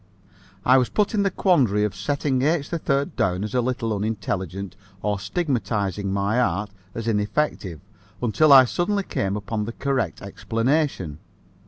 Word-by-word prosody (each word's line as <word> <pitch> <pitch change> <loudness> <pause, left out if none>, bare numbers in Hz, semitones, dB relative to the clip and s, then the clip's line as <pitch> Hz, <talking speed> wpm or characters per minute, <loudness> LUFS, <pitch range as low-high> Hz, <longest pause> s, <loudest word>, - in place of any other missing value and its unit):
I 130 +1 +6
was 125 - 0
put 210 0 +1
in 210 - +2
the 200 - +2
quandary 130 - +2
of 105 -2 -1
setting 130 +6 -1
H. 150 +1 +1
3rd 140 -4 -1
down 90 +1 0
as 105 - -5
a 125 - +2
little 120 -3 -1
unintelligent 100 -3 -3 0.3
or 105 -1 0
stigmatizing 105 - -1
my 100 +4 +1
art 105 -4 -1 0.2
as 115 0 -4
ineffective, 105 - -1 0.4
until 135 +6 +3
I 135 -2 +10
suddenly 200 +9 0
came 100 - -2
upon 105 +1 -3
the 115 - -5
correct 130 - -1
explanation. 115 - -1
115 Hz, 150 wpm, -23 LUFS, 100-140 Hz, 0.4 s, I